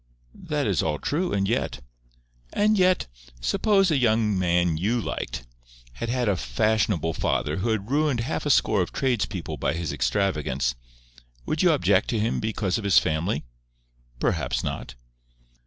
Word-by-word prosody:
"That - - -3
is - - +1
all 75 -1 -1
true, 170 - -1
and 100 -1 +1
yet—" 115 - -1 0.7
"And 215 +1 +3
yet, 185 -2 +3 0.3
suppose 195 - +2
a 150 - +3
young 110 -3 +2
man 90 -2 +2
you 110 +9 0
liked 60 - -4 0.5
had 115 - -5
had 125 -1 0
a 100 - +3
fashionable 85 - 0
father - - -1
who 100 +5 -1
had 110 +1 -2
ruined 145 -4 +2
half 140 +4 -2
a - - 0
score 105 -7 +3
of 90 - -2
trades 125 -5 0
people 90 -5 -5
by - - 0
his 85 -1 -3
extravagance—would - - -3
you 180 - +5
object 100 - +2
to 115 - 0
him 110 +2 0
because 105 -2 -1
of - - -7
his 100 -2 +4
family?" 80 0 +1 0.8
"Perhaps - - 0
not." - - -5
100 Hz, 155 wpm, -25 LUFS, 80-120 Hz, 0.8 s, you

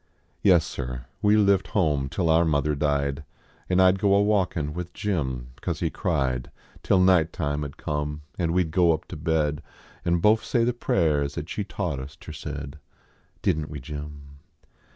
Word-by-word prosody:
Yes, 90 -5 +5
sir; 65 -4 -5 0.2
we 105 +1 +4
lived 100 -2 +3
home 75 -7 +1
till 85 +3 -1
our 80 +1 +5
mother 75 -2 +1
died, 70 0 0 0.5
An 90 0 +3
I 95 0 +7
d 95 - -3
go 100 0 +4
a 100 - +5
walkin 90 -8 0
with 90 +1 -6
Jim, 65 -11 -2
cause - - -2
he - - -1
cried, 65 -2 -1 0.3
Till 95 - +3
night 90 -3 +4
time 75 -1 -2
ud 70 -1 -7
come, 75 0 -3 0.2
nd 85 - +1
we 90 +2 +3
d 80 - -7
go 85 -1 +4
up 80 - -4
to - - -6
bed 75 -1 0 0.4
An* 85 -1 +2
bofe 105 +5 +4
say 120 -3 +1
the 120 +1 +1
prayers 75 -10 0
at 80 0 -5
she 105 - -2
taught 90 -7 -3
us 70 +3 -8
ter 80 - -11
said 75 -2 -7 0.6
Didn 75 0 +1
t - - -13
we, 75 - -6
Jim 75 0 -9
80 Hz, 190 wpm, -25 LUFS, 75-90 Hz, 0.6 s, I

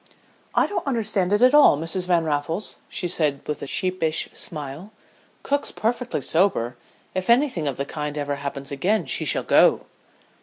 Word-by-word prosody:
"'I - - +4
don't 410 - -4
understand 215 -7 0
it 210 +4 +3
at 255 +2 +6
all, 295 - +7
Mrs. 165 +4 -2
Van 175 -2 +3
Raffles,' 155 +6 -1
she 180 - -3
said 150 -5 0
with 150 - -3
a - - -5
sheepish 180 -1 -1
smile. 150 +5 -6 0.5
'Cook's 285 0 -1
perfectly 240 - -2
sober. 135 -6 +1 0.4
If 185 +2 -3
anything 235 - +3
of 135 - -2
the 140 - -2
kind 150 0 -5
ever 145 -1 -2
happens 140 0 -6
again 185 +10 0
she - - -1
shall - - +1
go.'" - - +4
170 Hz, 165 wpm, -23 LUFS, 145-210 Hz, 0.5 s, all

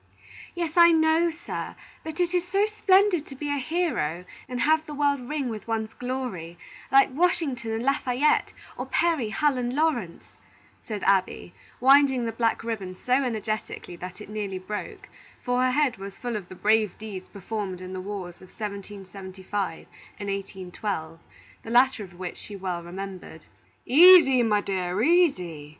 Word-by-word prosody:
"Yes, 340 -1 -3
I 340 0 +8
know, 320 +1 +3
sir; 330 +1 -6 0.3
but 320 +2 -7
it 350 0 +1
is 355 -1 +2
so 395 +3 +2
splendid 395 -5 +3
to 270 - -10
be 290 +2 -4
a 285 - 0
hero, 255 - -1 0.2
and 250 -1 -3
have 315 +1 +3
the 300 - -6
world 285 -1 +2
ring 295 -3 -2
with 220 -2 -6
one's 220 -1 -2
glory, 245 -10 -5 0.3
like 275 0 +5
Washington 285 -7 0
and 225 +1 -2
Lafayette, 270 +1 +1 0.2
or - - -5
Perry, 320 -10 +1
Hull, 280 +3 +1
and 245 +1 -2
Lawrence," 260 - 0 0.6
said 210 -3 -4
Abby, 190 -2 +1 0.3
winding 265 -1 +5
the 225 - -2
black 230 -1 0
ribbon 200 -5 -4
so 250 +7 -2
energetically 220 -6 -4
that 180 +2 -8
it 210 - -9
nearly 205 -2 -4
broke; 195 +3 -7 0.4
for 245 0 +1
her 255 - +3
head 270 -2 +1
was 195 0 -9
full 245 -2 -4
of 195 -4 -6
the 185 - -9
brave 215 0 +2
deeds 200 -4 -8
performed 200 -2 -5
in 185 0 -8
the 185 - -4
wars 185 -3 -6
of 185 - -16
1775 195 -2 -6 0.3
and 200 -1 -4
1812, 190 -4 -5 0.4
the - - -10
latter 245 -1 +4
of 175 -3 -13
which 180 -1 -6
she 205 - -9
well 185 -3 -3
remembered. 180 -2 -8 0.4
"Easy, 305 -3 +8
my 210 -3 +2
dear, 185 -1 -2
easy! 185 - +2
225 Hz, 165 wpm, -26 LUFS, 190-285 Hz, 0.6 s, I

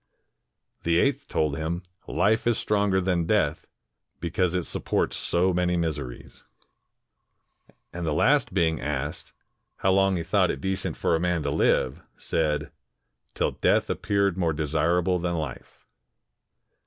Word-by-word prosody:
The 85 0 +2
eighth - - +1
told 75 -3 0
him, 80 +3 -3 0.2
"Life 110 +3 +1
is 120 - +3
stronger 100 -2 +1
than 90 -3 0
death, 80 -8 +1 0.5
because 90 +1 0
it 90 - 0
supports - - -1
so 90 +2 +1
many 90 0 +1
miseries." 75 -7 -4 1.5
And 90 0 -5
the 80 - 0
last 140 - +3
being 85 -4 +1
asked, 75 +2 -4 0.4
how 95 - +1
long 95 0 +3
he 85 - -2
thought 95 +1 +2
it - - -2
decent 95 0 -2
for - - +1
a - - 0
man 90 -2 0
to 70 - -1
Hve, 65 -3 +1 0.2
said, 75 -2 -1 0.6
"Till - - +1
death - - +1
appeared 100 -2 0
more 85 -3 +1
desirable 85 +4 +1
than 85 0 -1
Hfe." 75 -6 -5
85 Hz, 140 wpm, -26 LUFS, 80-95 Hz, 1.5 s, is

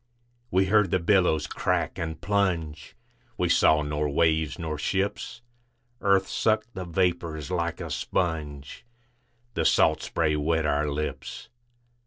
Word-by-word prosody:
We 95 0 +3
heard 105 0 +3
the - - +2
billows 90 -4 +2
crack - - -1
and 80 -2 -4
plunge, 85 -7 -1 0.4
We - - 0
saw 75 0 +4
nor 75 0 -1
waves 80 0 +1
nor 80 -4 -4
ships. 100 +6 -2 0.6
Earth 100 -1 +3
sucked 110 +1 0
the 95 -2 -5
vapors 85 -3 -1
like 85 -2 -1
a - - -6
sponge, 75 -6 -3 0.7
The 85 - 0
salt - - +3
spray 80 -2 0
wet 80 +2 0
our 75 0 +1
lips. 75 +2 -5
85 Hz, 130 wpm, -26 LUFS, 75-95 Hz, 0.7 s, saw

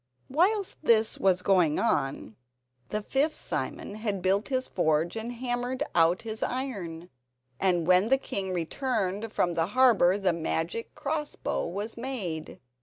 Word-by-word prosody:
Whilst 380 +7 +2
this 225 -5 +3
was 185 -2 +2
going 180 -6 +3
on 135 -5 0 0.5
the 210 0 -2
fifth 285 +7 +1
Simon - - -4
had 210 -3 -3
built 195 +3 +2
his 260 -1 -1
forge 160 0 +1
and 225 +2 -4
hammered 245 +2 -2
out 170 +3 +3
his 220 -1 -5
iron, 185 -10 -4 0.5
and 180 -3 +2
when 185 +5 +4
the 270 - +5
king 195 -7 -4
returned 205 - -2
from 175 -5 +1
the 165 0 +1
harbour 220 -8 +5
the 190 -3 +1
magic 165 +6 -3
cross 300 0 -3
bow - - -2
was 205 +7 -4
made. 210 -11 -4
205 Hz, 145 wpm, -28 LUFS, 175-255 Hz, 0.5 s, the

